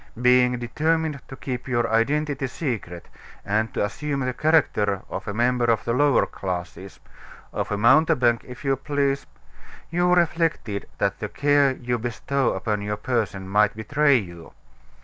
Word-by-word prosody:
Being 125 Hz, 0 st, +4 dB
determined 155 Hz, +5 st, -1 dB
to 135 Hz, -, -9 dB
keep 125 Hz, -1 st, -5 dB
your 120 Hz, -2 st, +1 dB
identity 140 Hz, +4 st, +1 dB
secret, 115 Hz, -, -5 dB, 0.4 s
and 110 Hz, +1 st, 0 dB
to -, -, +1 dB
assume 140 Hz, +6 st, -3 dB
the 130 Hz, 0 st, -1 dB
character 105 Hz, -, +1 dB
of 95 Hz, -, -5 dB
a 105 Hz, -, -3 dB
member 120 Hz, +1 st, +2 dB
of 115 Hz, -1 st, +1 dB
the 115 Hz, -, 0 dB
lower 145 Hz, +2 st, +3 dB
classes 90 Hz, 0 st, -6 dB, 0.5 s
of -, -, -3 dB
a 105 Hz, -, 0 dB
mountebank, 125 Hz, 0 st, +4 dB
if 125 Hz, +2 st, -11 dB
you 135 Hz, -1 st, +2 dB
please 140 Hz, 0 st, -1 dB, 0.6 s
you 175 Hz, +1 st, +2 dB
reflected 165 Hz, -, 0 dB
that 100 Hz, 0 st, -1 dB
the 105 Hz, -, -4 dB
care 145 Hz, -1 st, +3 dB
you 120 Hz, -2 st, -3 dB
bestow 125 Hz, +3 st, -1 dB
upon 100 Hz, +2 st, -2 dB
your 105 Hz, 0 st, -3 dB
person 105 Hz, -4 st, -2 dB
might 105 Hz, +1 st, +2 dB
betray 140 Hz, +6 st, +3 dB
you. 85 Hz, -6 st, -8 dB
125 Hz, 150 wpm, -24 LUFS, 105-140 Hz, 0.6 s, Being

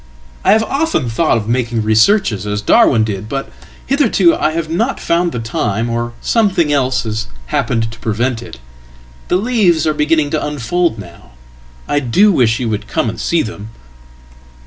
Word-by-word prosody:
I 195 Hz, -, +5 dB
have 220 Hz, +1 st, +3 dB
often 275 Hz, -, -1 dB
thought 155 Hz, +2 st, +1 dB
of 110 Hz, -, -4 dB
makingresearches 115 Hz, -, +1 dB
as 105 Hz, 0 st, -3 dB
Darwin 110 Hz, +2 st, +4 dB
did. 105 Hz, -1 st, -4 dB
But 135 Hz, +1 st, -4 dB, 0.3 s
hitherto 260 Hz, -, +3 dB
I 155 Hz, -, 0 dB
have 165 Hz, -1 st, -2 dB
not 225 Hz, +12 st, -1 dB
found 170 Hz, +1 st, 0 dB
the -, -, -5 dB
time, 115 Hz, -1 st, -2 dB
orsomething 150 Hz, -, 0 dB
else 130 Hz, -3 st, +1 dB
has 110 Hz, -1 st, -3 dB, 0.3 s
happened 115 Hz, -2 st, 0 dB
to 115 Hz, -, -13 dB
prevent 115 Hz, +2 st, -1 dB
it. 115 Hz, -, -10 dB, 0.7 s
The -, -, +1 dB
leaves 195 Hz, -7 st, +2 dB
are 155 Hz, -, +1 dB
beginning 150 Hz, 0 st, +1 dB
tounfold 150 Hz, +1 st, -1 dB
now. 85 Hz, -, -13 dB, 0.5 s
I 145 Hz, -, +1 dB
do 165 Hz, -, +3 dB
wish 115 Hz, -, +2 dB
you 125 Hz, -, -2 dB
would 105 Hz, -2 st, -3 dB
come 115 Hz, -, -1 dB
and -, -, -10 dB
see 170 Hz, -, +1 dB
them!" 110 Hz, -1 st, -8 dB
130 Hz, 160 wpm, -16 LUFS, 115-170 Hz, 0.7 s, I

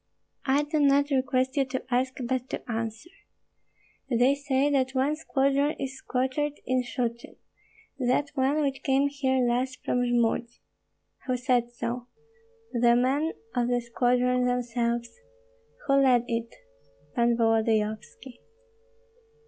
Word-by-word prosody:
"I 275 Hz, +2 st, +3 dB
do 300 Hz, +1 st, -1 dB
not 285 Hz, 0 st, +3 dB
request 260 Hz, -1 st, +1 dB
you 275 Hz, -, +3 dB
to 255 Hz, -1 st, -5 dB
ask, 255 Hz, +1 st, +1 dB
but 255 Hz, +1 st, -2 dB
to -, -, -5 dB
answer." 225 Hz, +7 st, -4 dB, 1.0 s
"They 250 Hz, +2 st, +4 dB
say 280 Hz, 0 st, 0 dB
that 265 Hz, -1 st, +1 dB
one 270 Hz, +4 st, +2 dB
squadron 280 Hz, -1 st, +1 dB
is 270 Hz, -1 st, -5 dB
quartered 265 Hz, +3 st, -1 dB
in 255 Hz, 0 st, +1 dB
Shchuchyn, 240 Hz, -1 st, -4 dB, 0.6 s
that 260 Hz, +3 st, +1 dB
one 285 Hz, +2 st, +1 dB
which 275 Hz, -1 st, -2 dB
came 275 Hz, +1 st, +2 dB
here 265 Hz, -3 st, +1 dB
last 255 Hz, +2 st, -1 dB
from 250 Hz, -, +1 dB
Jmud." 240 Hz, -1 st, +1 dB, 0.8 s
"Who 255 Hz, -1 st, +1 dB
said 245 Hz, -1 st, +1 dB
so?" 240 Hz, +1 st, -4 dB, 0.7 s
"The 240 Hz, 0 st, +4 dB
men 275 Hz, +6 st, +1 dB, 0.2 s
of 240 Hz, -1 st, +1 dB
the 245 Hz, 0 st, +1 dB
squadron 250 Hz, +1 st, +1 dB
themselves." 235 Hz, -1 st, -1 dB, 0.7 s
"Who 275 Hz, 0 st, +4 dB
led 250 Hz, -3 st, +4 dB
it?" 230 Hz, 0 st, -2 dB, 0.6 s
"Pan 235 Hz, 0 st, +2 dB
Volodyovski." 225 Hz, +2 st, 0 dB
255 Hz, 125 wpm, -27 LUFS, 240-275 Hz, 1.0 s, They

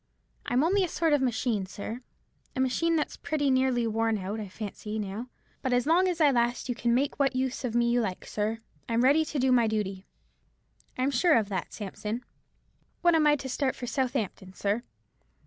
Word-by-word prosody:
I'm 250 Hz, +3 st, +2 dB
only 385 Hz, +4 st, +3 dB
a -, -, +1 dB
sort 325 Hz, -1 st, +1 dB
of 290 Hz, -, +3 dB
machine, 235 Hz, -5 st, 0 dB
sir—a 235 Hz, +6 st, -9 dB
machine 295 Hz, +6 st, +2 dB
that's 305 Hz, -, -1 dB
pretty 290 Hz, -3 st, 0 dB
nearly 260 Hz, -2 st, +2 dB
worn 225 Hz, 0 st, +1 dB
out, 200 Hz, +3 st, -4 dB
I 210 Hz, -, -5 dB
fancy, 210 Hz, +1 st, -6 dB
now—but 225 Hz, +5 st, -5 dB
as 245 Hz, -1 st, +2 dB
long 345 Hz, +5 st, +4 dB
as 355 Hz, -2 st, -1 dB
I 300 Hz, -3 st, +6 dB
last 240 Hz, 0 st, +1 dB
you 245 Hz, -, 0 dB
can 235 Hz, 0 st, +1 dB
make 275 Hz, +3 st, 0 dB
what 275 Hz, -2 st, +2 dB
use 260 Hz, +1 st, -1 dB
of 240 Hz, -2 st, -2 dB
me 235 Hz, 0 st, +3 dB
you 240 Hz, 0 st, +3 dB
like, 190 Hz, -5 st, -3 dB
sir. 215 Hz, +2 st, -2 dB, 0.3 s
I'm 230 Hz, +1 st, +2 dB
ready 290 Hz, +5 st, +5 dB
to 305 Hz, -, -4 dB
do 260 Hz, -1 st, +2 dB
my 240 Hz, -3 st, +4 dB
duty." 200 Hz, -3 st, -2 dB, 0.9 s
"I 255 Hz, -, 0 dB
am 275 Hz, -, +2 dB
sure 310 Hz, +6 st, +4 dB
of 215 Hz, -3 st, 0 dB
that, 190 Hz, -3 st, -3 dB
Sampson." 215 Hz, +3 st, -5 dB, 0.8 s
"When 345 Hz, -1 st, +5 dB
am 315 Hz, -2 st, +4 dB
I 295 Hz, -, +6 dB
to 270 Hz, -2 st, -6 dB
start 260 Hz, +1 st, -1 dB
for 245 Hz, -, -6 dB
Southampton, 235 Hz, -8 st, -2 dB
sir?" 205 Hz, +3 st, 0 dB
245 Hz, 200 wpm, -28 LUFS, 220-280 Hz, 0.9 s, I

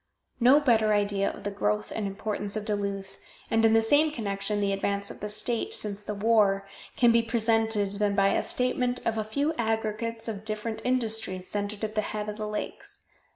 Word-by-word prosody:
No 255 Hz, +4 st, +7 dB
better 225 Hz, -6 st, +3 dB
idea 200 Hz, -1 st, +1 dB
of -, -, -9 dB
the 205 Hz, -, -2 dB
growth 105 Hz, -, -1 dB
and 210 Hz, -2 st, -1 dB
importance 205 Hz, 0 st, -3 dB
of 215 Hz, -1 st, -3 dB
Duluth, 200 Hz, -2 st, -3 dB, 0.3 s
and, 225 Hz, 0 st, +3 dB
in 225 Hz, 0 st, +5 dB
the 225 Hz, 0 st, +5 dB
same 290 Hz, +7 st, +4 dB
connection, 210 Hz, -5 st, -2 dB
the 200 Hz, -1 st, +1 dB
advance 200 Hz, 0 st, -1 dB
of -, -, -11 dB
the 210 Hz, -, -4 dB
state, 240 Hz, -, -1 dB
since 205 Hz, -1 st, -3 dB
the 210 Hz, 0 st, -5 dB
war, 200 Hz, -2 st, +3 dB, 0.3 s
can 240 Hz, -1 st, +5 dB
be 230 Hz, 0 st, +4 dB
presented 225 Hz, -3 st, +1 dB
than 205 Hz, -1 st, +1 dB
by 195 Hz, -1 st, +4 dB
a -, -, +2 dB
statement 250 Hz, 0 st, 0 dB
of 225 Hz, -1 st, 0 dB
a -, -, 0 dB
few 280 Hz, +9 st, -1 dB
aggregates 225 Hz, 0 st, -1 dB
of 210 Hz, -2 st, -4 dB
different 215 Hz, +1 st, -3 dB
industries 220 Hz, -7 st, -1 dB
centered 205 Hz, +1 st, -3 dB
at 215 Hz, 0 st, -2 dB
the 215 Hz, -, +1 dB
head 210 Hz, 0 st, -4 dB
of 210 Hz, -, -6 dB
the 215 Hz, -1 st, -3 dB
lakes. 210 Hz, 0 st, -5 dB
215 Hz, 200 wpm, -27 LUFS, 200-230 Hz, 0.3 s, No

